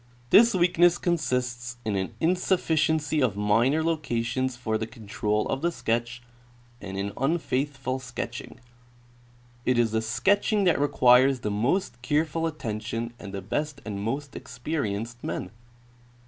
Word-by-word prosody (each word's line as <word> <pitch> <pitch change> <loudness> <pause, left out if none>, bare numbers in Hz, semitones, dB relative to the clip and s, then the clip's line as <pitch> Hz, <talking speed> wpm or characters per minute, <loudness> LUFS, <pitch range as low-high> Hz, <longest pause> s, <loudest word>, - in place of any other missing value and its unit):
This 235 +1 +7
weakness 175 -1 +4
consists 125 -8 -1
in 105 -2 -1
an 95 +4 -3
insuffi 180 0 +1
ciency 155 -1 +1
of 115 -6 +1
minor 115 +9 +2
locations 130 -5 -1
for 110 -3 -2
the 110 - -3
control 105 -2 -2
of 135 - -2
the 170 +1 +1
sketch 120 -3 -2 0.6
and 95 -1 -6
in 100 +1 -2
unfaithful 135 -3 -1
sketching. 125 -2 -6 1.0
It 125 0 +2
is 115 -2 +3
the 110 0 +1
sketching 195 - +2
that 175 -5 +3
requires 130 -2 +5
the 105 - -2
most 120 - 0
careful 155 +3 0
attention 115 -5 -4
and 105 -3 -8
the 100 -1 -6
best 145 +7 -3
and 100 -2 -4
most 135 +6 -3
experienced 120 -4 -4
men. 90 - -4
125 Hz, 135 wpm, -26 LUFS, 115-155 Hz, 1.0 s, This